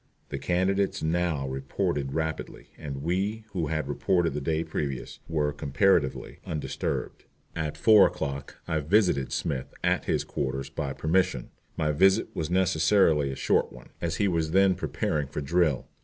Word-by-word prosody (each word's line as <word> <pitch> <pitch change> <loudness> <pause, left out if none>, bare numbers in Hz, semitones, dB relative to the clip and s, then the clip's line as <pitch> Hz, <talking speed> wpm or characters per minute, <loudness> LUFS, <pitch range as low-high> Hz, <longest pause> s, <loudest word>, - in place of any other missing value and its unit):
The - - -4
candidates 95 +2 0
now 80 -4 0
reported 70 +1 -2
rapidly, 80 -1 -4
and 70 -2 -6
we, 100 +6 -1
who 85 -6 -1
had 80 -2 -2
reported 80 +4 +1
the 75 - -3
day 80 +3 0
previous, 70 -6 -4
were 75 -2 0
comparatively 70 -1 +1
undisturbed. 75 -2 -4 0.3
At 80 -3 -3
four 110 -3 +7
o'clock 70 0 -5
I 80 -2 0
visited 80 -4 +2
Smith 65 -3 -2
at - - +1
his - - 0
quarters 70 +1 -3
by 75 -4 -3
permission. 90 +7 0 0.3
My 75 -2 +1
visit 95 +6 +3
was 80 - -2
necessarily 90 -4 +3
a - - -5
short - - +1
one, - - -13
as 85 -1 -1
he 100 +4 +1
was 80 -3 0
then 95 0 +5
preparing 75 -5 -2
for 75 - -5
drill. 75 -1 +1
80 Hz, 155 wpm, -27 LUFS, 70-90 Hz, 0.3 s, four